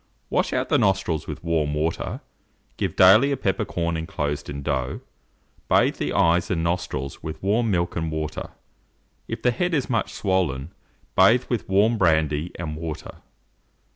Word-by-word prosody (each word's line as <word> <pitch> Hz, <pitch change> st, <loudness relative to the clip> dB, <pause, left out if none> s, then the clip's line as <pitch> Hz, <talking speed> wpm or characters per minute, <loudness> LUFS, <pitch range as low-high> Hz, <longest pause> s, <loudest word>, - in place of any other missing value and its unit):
Wash -, -, +1 dB
out -, -, -1 dB
the -, -, +3 dB
nostrils 90 Hz, -5 st, +1 dB
with -, -, -6 dB
warm 80 Hz, -3 st, 0 dB
water, 80 Hz, +2 st, -2 dB, 0.5 s
give -, -, -2 dB
daily 110 Hz, +10 st, +7 dB
a 140 Hz, -, 0 dB
peppercorn 85 Hz, -5 st, -1 dB
inclosed 75 Hz, -4 st, -3 dB
in 70 Hz, 0 st, -5 dB
dough; 65 Hz, -3 st, -2 dB, 0.7 s
bathe -, -, +3 dB
the -, -, -2 dB
eyes 85 Hz, +1 st, +3 dB
and 80 Hz, -2 st, 0 dB
nostrils 85 Hz, -5 st, -3 dB
with 80 Hz, +3 st, -7 dB
warm 110 Hz, +4 st, +2 dB
milk 85 Hz, -3 st, 0 dB
and 80 Hz, -1 st, -2 dB
water. 80 Hz, -1 st, -4 dB, 0.8 s
If -, -, -5 dB
the 125 Hz, -, +4 dB
head 175 Hz, +6 st, 0 dB
is 135 Hz, -3 st, -1 dB
much 115 Hz, -4 st, 0 dB
swollen, 85 Hz, -7 st, -1 dB, 0.4 s
bathe 115 Hz, +7 st, +5 dB
with 120 Hz, -5 st, -2 dB
warm 105 Hz, +4 st, +3 dB
brandy 80 Hz, -2 st, +2 dB
and 80 Hz, -3 st, -4 dB
water. 80 Hz, -1 st, -6 dB
85 Hz, 155 wpm, -24 LUFS, 75-100 Hz, 0.8 s, daily